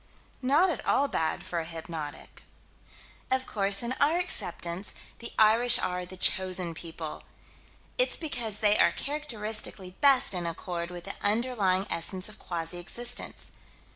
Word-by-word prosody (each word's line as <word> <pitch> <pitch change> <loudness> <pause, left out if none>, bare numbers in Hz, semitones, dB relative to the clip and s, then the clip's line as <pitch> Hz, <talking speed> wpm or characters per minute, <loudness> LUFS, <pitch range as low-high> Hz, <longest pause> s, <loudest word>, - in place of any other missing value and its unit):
Not 295 +8 +3
at - - -5
all 280 - +2
bad 160 - -1
for 170 - -3
a - - -3
hypnotic. 160 -2 -7 0.9
Of 260 0 +1
course, 200 +1 +1
in 235 +2 -2
our 305 +4 +3
acceptance, 190 - -2 0.2
the 235 - -6
Irish 225 +3 +7
are 180 0 -2
the 185 - -9
Chosen 185 -2 +3
People. 160 -1 -7 0.8
It's - - +3
because 235 - -2
they 210 -1 +4
are - - +5
characteristically 220 -9 -3
best 275 -7 +5
in 175 -2 -2
accord 170 0 -4
with 175 -1 -8
the 195 - -5
underlying 205 -4 +1
essence 185 +3 +1
of 215 - -12
quasi 170 0 -4
existence. 240 +7 -2
195 Hz, 140 wpm, -28 LUFS, 175-245 Hz, 0.9 s, Irish